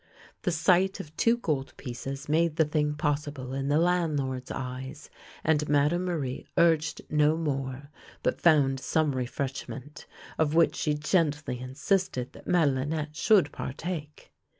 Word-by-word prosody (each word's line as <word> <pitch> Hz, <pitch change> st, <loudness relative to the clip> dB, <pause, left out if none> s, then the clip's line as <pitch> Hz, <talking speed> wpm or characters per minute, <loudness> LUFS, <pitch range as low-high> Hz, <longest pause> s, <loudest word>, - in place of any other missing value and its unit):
The 180 Hz, -, 0 dB
sight 180 Hz, +4 st, +3 dB
of 155 Hz, 0 st, -9 dB
two 235 Hz, +1 st, +3 dB
gold 150 Hz, -, -2 dB
pieces 135 Hz, +2 st, -6 dB
made 160 Hz, +1 st, +2 dB
the 160 Hz, -, +4 dB
thing 150 Hz, -1 st, 0 dB
possible 145 Hz, -3 st, -2 dB
in 135 Hz, 0 st, -2 dB
the 145 Hz, +1 st, +3 dB
landlord's 150 Hz, -7 st, 0 dB
eyes, 130 Hz, +3 st, -6 dB, 0.3 s
and 150 Hz, -2 st, +2 dB
Madame 150 Hz, +5 st, +2 dB
Marie 145 Hz, -8 st, -3 dB
urged 160 Hz, -2 st, +3 dB
no 150 Hz, +1 st, +3 dB
more, 140 Hz, -2 st, -3 dB, 0.3 s
but -, -, 0 dB
found 140 Hz, -5 st, +4 dB
some 155 Hz, +2 st, +1 dB
refreshment, 135 Hz, +2 st, -5 dB, 0.3 s
of 155 Hz, -1 st, +2 dB
which 165 Hz, 0 st, +4 dB
she 150 Hz, -1 st, 0 dB
gently 150 Hz, -4 st, 0 dB
insisted 130 Hz, +1 st, -1 dB
that -, -, -14 dB
Madelinette 150 Hz, -1 st, +1 dB
should 185 Hz, -5 st, +4 dB
partake. 150 Hz, +1 st, -6 dB
150 Hz, 135 wpm, -28 LUFS, 135-160 Hz, 0.3 s, the